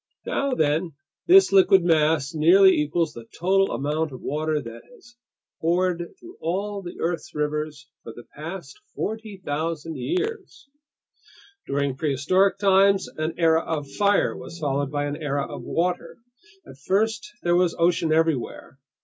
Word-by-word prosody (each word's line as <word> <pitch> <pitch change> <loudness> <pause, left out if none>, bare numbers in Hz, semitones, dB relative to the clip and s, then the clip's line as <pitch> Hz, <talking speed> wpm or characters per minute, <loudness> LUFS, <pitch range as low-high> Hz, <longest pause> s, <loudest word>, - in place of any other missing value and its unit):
Now 275 -2 -1
then, 160 +2 0 0.3
this 380 +2 +7
liquid 195 -1 +5
mass 155 -3 +2
nearly 185 +5 +6
equals 150 +1 0
the 115 -1 -11
total 195 +3 +2
amount 150 +2 -1
of 130 - -9
water 155 +1 -1
that 115 -3 -9
has 245 0 -20 0.4
poured 175 - 0
through 350 +1 -13
all 200 +4 -2
the 175 -2 -9
earth's 170 -1 -3
rivers 150 -1 -3
for 115 - -9
the 120 - -12
past 155 -1 -8 0.2
40,000 165 -7 -4
years! 390 -2 -4 1.0
During 140 -1 -1
prehistoric 160 +8 +1
times, 195 0 +4
an 155 +1 -3
era 165 -1 +3
of 150 -4 -4
fire 205 -1 +2
was 170 - -9
followed 140 -3 -1
by 145 0 -2
an 145 0 -3
era 145 -2 -1
of - - -8
water. 175 +2 -2 0.5
At 135 - -14
first 220 +8 -1
there 175 0 +2
was 175 -1 +2
ocean 170 -1 +2
everywhere. 155 -4 -1
165 Hz, 140 wpm, -24 LUFS, 150-190 Hz, 1.0 s, this